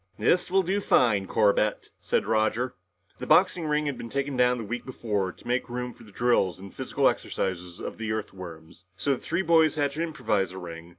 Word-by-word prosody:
"This 175 +13 +2
will 190 +1 +3
do 195 +4 0
fine, 105 - +3
Corbett," 105 -1 +2
said - - 0
Roger. 110 +3 +1 0.5
The - - -6
boxing 170 -3 +4
ring 150 0 +1
had 140 -3 -3
been 115 - -6
taken 140 +1 -2
down 125 0 +3
the 115 - -4
week 120 +3 -4
before 105 -7 -2
to - - -16
make 125 +1 0
room 125 0 -4
for - - -16
drills 105 -4 +1
and 95 0 -10
the - - -25
physical - - +1
exercises 90 -2 -2
of - - -6
the 110 -1 -2
Earthworms, 90 -6 -7
so 140 - 0
the 135 - 0
three 170 +4 -1
boys 160 -3 +4
had 145 -2 +1
to 155 +3 -4
improvise 105 - -1
a - - -8
ring. 85 -2 -8
115 Hz, 210 wpm, -27 LUFS, 100-140 Hz, 0.5 s, boxing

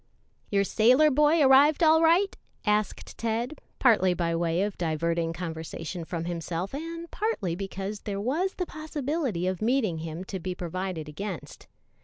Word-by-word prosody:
"Your 200 -1 +2
sailor 255 +9 +4
boy 300 +3 +4
arrived 280 +4 +6
all 320 0 +6
right?" 345 +5 +4 0.3
asked 210 -1 -1
Ted, 235 +5 -2 0.2
partly 190 -8 +4
by 170 -1 0
way 170 +2 +1
of 205 -1 -2
diverting 165 0 0
conversation 165 0 -5
from 165 0 -4
himself 175 +3 -3
and 330 +3 -6
partly 305 - -1
because 195 +2 -5
there 200 -2 -4
was 310 - -1
the 360 - -2
possibility 295 - -3
of 185 -1 -2
meeting 220 -8 +1
him 165 +2 -5
to 190 0 -5
be 180 +1 -4
provided 180 -2 -4
against. 180 +4 -7
200 Hz, 150 wpm, -27 LUFS, 170-285 Hz, 0.3 s, arrived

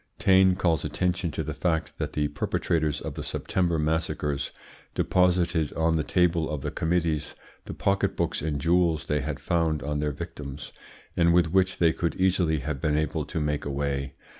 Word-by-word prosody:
Taine 95 -1 +5
calls 85 -5 +1
attention 90 -1 -1
to - - -3
the - - -4
fact 80 -3 -1
that - - -3
the 75 -1 +1
perpetrators 75 +1 -1
of - - -5
the - - -6
September 85 -3 -1
massacres 75 -2 -1 0.5
deposited 90 -4 +2
on 80 0 +1
the 80 - +1
table 85 -1 +2
of 75 -3 -3
the - - -3
committees 80 -2 -1 0.3
the - - -7
pocket 100 0 0
books - - -1
and 75 -1 -2
jewels 85 0 +2
they 75 - 0
had 70 +1 -4
found 80 -3 0
on 75 +1 -2
their 75 0 0
victims, 75 -3 -7 0.4
and 85 0 +4
with 85 -2 +3
which 95 0 +2
they 85 -2 +4
could 85 - -2
easily 90 -5 +2
have 70 -1 -4
been 75 -1 +1
able 75 -1 -1
to - - -4
make 75 -1 -1
away. 70 -1 -2
80 Hz, 180 wpm, -26 LUFS, 75-85 Hz, 0.5 s, Taine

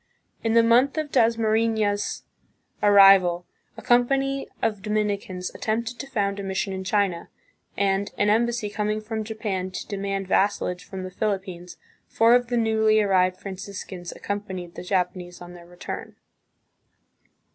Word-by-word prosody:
In 225 -1 +1
the 230 0 +6
month 245 +6 +3
of 305 -2 -2
Dasmarifias' 220 -2 +1 0.6
arrival, 195 -4 +6 0.3
a - - -10
company 270 +3 +2
of 215 -3 -1
Dominicans 205 -3 -2
attempted 230 +2 -3
to 275 - -6
f9und 200 -5 -1
a - - -4
mission 190 0 -2
in 190 0 -4
China, 190 -3 0 0.5
and, 200 0 +1
an 205 - +2
embassy 235 +1 +1
coming 210 +1 -2
from 220 0 -4
Japan 210 -4 -3
to 185 - -6
demand 195 -1 -3
vassalage 190 -2 0
from 190 -1 -7
the 185 - -6
Philippines, 185 -3 -4 0.3
four 230 +1 +4
of 245 0 +3
the 240 0 -1
newly 220 -1 +3
arrived 185 -3 +2
Franciscans 190 -2 -7
ac - - -15
co'mpanied 190 -4 -4
the - - -8
Japanese 180 -1 -2
on 175 0 -10
their 170 -1 -13
return. 175 0 -8
205 Hz, 145 wpm, -24 LUFS, 185-225 Hz, 0.6 s, the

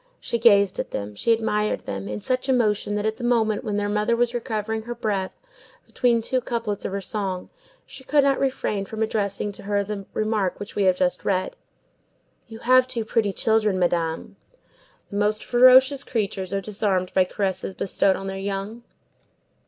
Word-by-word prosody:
She 235 - -2
gazed 200 -4 +4
at - - -3
them, 105 0 -5
she 165 - 0
admired 215 -2 0
them, 100 0 -5
in 105 0 -5
such 255 +1 -1
emotion 210 -5 +1
that 210 0 -2
at 220 0 -1
the 245 - -8
moment 225 -3 +1
when 210 -3 -2
their 205 0 0
mother 210 +3 +1
was 240 0 +1
recovering 220 -2 -3
her 240 +2 -6
breath 195 -4 -3 0.5
between 235 -2 +1
two 255 +2 0
couplets 230 -4 -3
of - - -2
her 200 +1 -3
song, 190 -3 -4 0.3
she 265 - -11
could 290 +2 +3
not 275 -1 +2
refrain 255 -7 -1
from 220 +2 -3
addressing 205 -2 -2
to - - -11
her 200 0 0
the 200 -1 -6
remark 215 -4 -1
which 205 - -8
we 200 - +1
have 185 -1 +4
just 180 -1 0
read:— 190 - -1 0.9
"You 225 - -10
have 255 +1 +5
two 235 -3 -3
pretty 220 -2 +1
children, 215 -1 +1
Madame." 170 -2 -1 0.7
The 200 - -3
most 210 +1 +1
ferocious 260 +2 +6
creatures 200 -5 -3
are 195 0 -1
disarmed 195 -3 -1
by 185 - +4
caresses 190 -1 -3
bestowed 195 0 +1
on 195 - -6
their 195 0 -4
young. 200 +4 -4
210 Hz, 185 wpm, -24 LUFS, 195-235 Hz, 0.9 s, ferocious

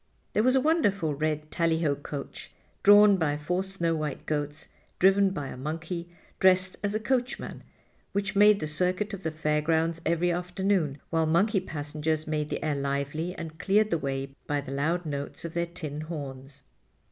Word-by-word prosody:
There 210 - +3
was 255 +3 +4
a 265 - +4
wonderful 200 - +2
red 155 +1 -2
tally 165 -1 +1
ho 145 -3 +3
coach, 140 0 -7 0.3
drawn 205 0 +7
by 150 -4 0
four 180 +5 -1
snow 190 -4 -1
white 155 -3 -4
goats 145 -1 -3 0.3
driven 195 +1 +5
by 145 -8 -4
a - - -7
monkey 165 +5 -4 0.3
dressed 185 0 +4
as 205 +1 0
a - - +1
coachman, 250 +3 -2 0.5
which 200 +1 -2
made 210 0 +6
the - - -1
circuit 185 +7 -1
of 195 - -5
the 160 - -1
Fair 155 -1 0
grounds 165 +1 +1
every 170 +1 +1
afternoon, 180 -3 0
while 165 -1 +2
monkey 195 +6 +3
passengers 155 -1 -3
made 150 -1 -2
the - - -3
air 150 -2 +1
lively 140 +5 -2
and 160 -1 -8
cleared 210 +2 +3
the 165 - +2
way 135 -1 -3
by 145 0 0
the 140 -1 -7
loud 165 +6 0
notes 145 +1 -5
of 165 - -5
their 170 0 0
tin 155 -4 -6
horns. 140 -4 -7
165 Hz, 180 wpm, -28 LUFS, 150-190 Hz, 0.5 s, drawn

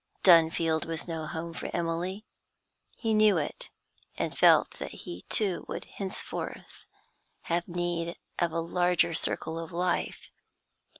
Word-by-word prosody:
Dunfield 165 -2 +5
was 165 +1 -4
no 160 -2 -3
home 165 +1 -5
for - - -5
Emily; 175 +5 -2 0.7
he 225 -2 0
knew 215 -3 +6
it, 145 - -2 0.5
and - - -2
felt - - +6
that - - -4 0.2
he, 85 +2 -7
too, 195 -5 +1
would - - -5
henceforth 195 -1 -6 0.6
have 170 +1 -1
need 175 -1 -2 0.2
of 170 -1 +2
a 165 +1 0
larger 175 0 +2
circle 160 0 -1
of 165 +2 -6
life. 175 +1 -1
170 Hz, 130 wpm, -29 LUFS, 165-180 Hz, 0.7 s, knew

